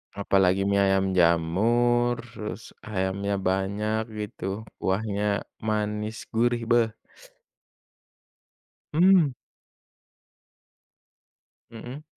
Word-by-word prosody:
Apalagi 95 Hz, -1 st, +2 dB
mie 100 Hz, 0 st, +2 dB
ayam 95 Hz, -1 st, +2 dB
jamur, 115 Hz, +9 st, +3 dB, 0.2 s
terus 110 Hz, 0 st, -7 dB, 0.2 s
ayamnya 100 Hz, 0 st, -1 dB
banyak 100 Hz, +3 st, 0 dB, 0.2 s
gitu, 100 Hz, +1 st, -5 dB, 0.2 s
kuahnya 100 Hz, +1 st, -1 dB, 0.2 s
manis 105 Hz, 0 st, -2 dB
gurih, 120 Hz, +1 st, +1 dB
beh. 120 Hz, -1 st, +5 dB, 2.1 s
Mmm. 175 Hz, -2 st, +5 dB, 2.4 s
Mhm. 120 Hz, +6 st, -9 dB
105 Hz, 70 wpm, -26 LUFS, 95-115 Hz, 2.4 s, beh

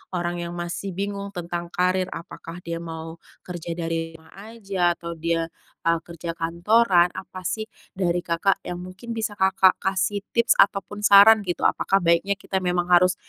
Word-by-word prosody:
orang 175 Hz, 0 st, -2 dB
yang 170 Hz, 0 st, -5 dB
masih 175 Hz, +3 st, -4 dB
bingung 200 Hz, 0 st, -3 dB
tentang 175 Hz, 0 st, -4 dB
karir, 185 Hz, +1 st, 0 dB
apakah 165 Hz, 0 st, -9 dB
dia 170 Hz, 0 st, -3 dB
mau 165 Hz, 0 st, -7 dB, 0.3 s
kerja 175 Hz, -2 st, -6 dB
dari 165 Hz, -1 st, -3 dB
rumah 160 Hz, 0 st, -20 dB
aja 195 Hz, -4 st, -1 dB
atau 170 Hz, 0 st, -6 dB
dia, 165 Hz, 0 st, 0 dB, 0.4 s
eee, 165 Hz, 0 st, +3 dB
kerja 170 Hz, 0 st, -7 dB
kantoran. 175 Hz, +2 st, +3 dB
Apa 185 Hz, -1 st, -8 dB
sih 215 Hz, +4 st, -2 dB, 0.3 s
dari 175 Hz, -2 st, 0 dB
Kakak 170 Hz, +4 st, +1 dB
yang 180 Hz, 0 st, -5 dB
mungkin 185 Hz, +6 st, -8 dB
bisa 220 Hz, -2 st, -3 dB
Kakak 190 Hz, -1 st, +4 dB
kasih 195 Hz, +1 st, 0 dB
tips 235 Hz, +1 st, +4 dB
ataupun 200 Hz, +1 st, +2 dB
saran, 205 Hz, +2 st, +8 dB
gitu? 175 Hz, -, -3 dB
Apakah 195 Hz, 0 st, +2 dB
baiknya 170 Hz, +4 st, +2 dB
kita 195 Hz, -2 st, -3 dB
memang 180 Hz, -1 st, 0 dB
harus, 180 Hz, +1 st, +5 dB
180 Hz, 165 wpm, -24 LUFS, 170-195 Hz, 0.4 s, saran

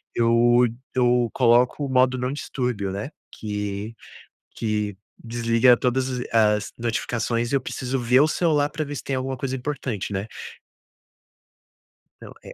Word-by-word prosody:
eu 120 Hz, +1 st, +4 dB
d 115 Hz, -, -8 dB, 0.2 s
eu 125 Hz, -1 st, +3 dB
coloco 125 Hz, +3 st, +3 dB
o -, -, -5 dB
modo 130 Hz, 0 st, +3 dB
não 125 Hz, +2 st, -2 dB
distúrbio, 125 Hz, -9 st, -3 dB
né, 100 Hz, +8 st, -4 dB, 0.2 s
que 105 Hz, +1 st, -5 dB, 0.6 s
que 105 Hz, -3 st, -2 dB, 0.3 s
desliga 115 Hz, +1 st, +4 dB
todas 130 Hz, +2 st, 0 dB
as 125 Hz, -1 st, -3 dB
as 105 Hz, -2 st, +2 dB
notificações 115 Hz, 0 st, -1 dB
e 140 Hz, -, +3 dB
eu -, -, +1 dB
preciso 130 Hz, +1 st, -3 dB
ver 125 Hz, +2 st, +4 dB
o 150 Hz, -, +5 dB
celular 155 Hz, -3 st, +1 dB
pra 155 Hz, -1 st, -3 dB
ver 145 Hz, 0 st, -6 dB
se -, -, -5 dB
tem 135 Hz, -, -2 dB
alguma 130 Hz, 0 st, -3 dB
coisa 130 Hz, +1 st, -3 dB
importante, 125 Hz, -7 st, -4 dB
né? 95 Hz, +1 st, -3 dB, 2.0 s
Não, -, -, -10 dB
é. -, -, -10 dB
120 Hz, 155 wpm, -23 LUFS, 115-130 Hz, 2.0 s, o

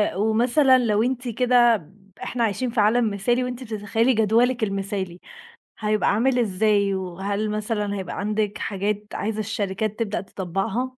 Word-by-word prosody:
ومثلًا 240 Hz, +6 st, +4 dB
لو 220 Hz, -3 st, +2 dB
أنتِ 250 Hz, 0 st, -2 dB
كده 240 Hz, -1 st, +4 dB
ب 180 Hz, +1 st, -18 dB, 0.3 s
إحنا 240 Hz, -1 st, -2 dB
عايشين 230 Hz, +4 st, 0 dB
في 230 Hz, -, -2 dB
عالم 225 Hz, +2 st, +3 dB
مثالي، 240 Hz, +5 st, +1 dB
وأنتِ 250 Hz, 0 st, -5 dB
بتتخيّلي 225 Hz, +2 st, 0 dB
جدولِك 230 Hz, +3 st, +2 dB
المثالي، 195 Hz, -3 st, -3 dB, 0.6 s
هيبقى 215 Hz, -1 st, +1 dB
عامل 250 Hz, +3 st, +2 dB
إزاي؟ 205 Hz, -2 st, +2 dB
وهل 195 Hz, +3 st, -3 dB
مثلًا 210 Hz, -1 st, -2 dB
هيبقى 190 Hz, -2 st, -5 dB
عندِك 210 Hz, 0 st, -1 dB
حاجات 205 Hz, +1 st, -2 dB
عايزة 215 Hz, +1 st, -2 dB
الشركات 210 Hz, 0 st, -2 dB
تبدأ 215 Hz, -3 st, -1 dB
تطبّقها؟ 195 Hz, +5 st, -3 dB
215 Hz, 140 wpm, -23 LUFS, 200-240 Hz, 0.6 s, ومثلًا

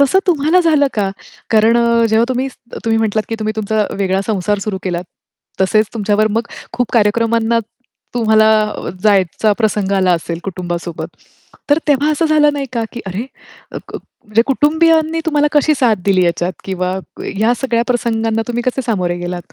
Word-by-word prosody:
तसं 280 Hz, +7 st, +4 dB
तुम्हाला 330 Hz, +1 st, +3 dB
झालं 310 Hz, -4 st, +3 dB
का? 200 Hz, -3 st, 0 dB, 0.4 s
कारण 225 Hz, +1 st, +4 dB
अ, 235 Hz, -1 st, +3 dB
जेव्हा 220 Hz, +1 st, +3 dB
तुम्ही 255 Hz, +1 st, -1 dB, 0.4 s
तुम्ही 225 Hz, -1 st, +2 dB
म्हटलात 215 Hz, -1 st, 0 dB
की 225 Hz, -, -2 dB
तुम्ही 215 Hz, 0 st, -2 dB
तुमचा 215 Hz, 0 st, 0 dB
वेगळा 190 Hz, -1 st, +1 dB
संसार 205 Hz, -1 st, 0 dB
सुरू 195 Hz, -3 st, -2 dB
केलात. 175 Hz, -1 st, -3 dB, 0.6 s
तसेच 215 Hz, +3 st, +3 dB
तुमच्यावर 215 Hz, -1 st, +1 dB
मग 225 Hz, +2 st, 0 dB, 0.3 s
खूप 245 Hz, -1 st, -1 dB
कार्यक्रमांना 230 Hz, +1 st, +2 dB, 0.6 s
तुम्हाला 220 Hz, -2 st, +3 dB, 0.6 s
जायचा 205 Hz, 0 st, +2 dB
प्रसंग 210 Hz, -3 st, 0 dB
आला 185 Hz, -1 st, +3 dB
असेल 170 Hz, 0 st, -2 dB
कुटुंबासोबत. 175 Hz, -2 st, -5 dB, 0.6 s
तर 290 Hz, -, +5 dB
तेव्हा 290 Hz, +1 st, +3 dB
असं 315 Hz, +2 st, +1 dB
झालं 300 Hz, -1 st, +4 dB
नाही 280 Hz, -1 st, -3 dB
का 235 Hz, -2 st, -1 dB
की 240 Hz, -, -6 dB
अरे 190 Hz, +3 st, -3 dB, 0.5 s
अ, -, -, -6 dB, 0.5 s
म्हणजे 215 Hz, +1 st, +2 dB
कुटुंबियांनी 320 Hz, +3 st, +2 dB
तुम्हाला 295 Hz, -2 st, +2 dB
कशी 300 Hz, +1 st, +3 dB
साथ 235 Hz, -4 st, +3 dB
दिली 190 Hz, -2 st, +3 dB
याच्यात 175 Hz, +1 st, 0 dB
किंवा 185 Hz, 0 st, -2 dB, 0.4 s
या 225 Hz, +2 st, +3 dB
सगळ्या 235 Hz, -3 st, +1 dB
प्रसंगांना 225 Hz, -2 st, 0 dB
तुम्ही 240 Hz, 0 st, -2 dB
कसे 255 Hz, +1 st, 0 dB
सामोरे 180 Hz, -6 st, -1 dB
गेलात? 175 Hz, 0 st, -6 dB
225 Hz, 160 wpm, -16 LUFS, 195-255 Hz, 0.6 s, तर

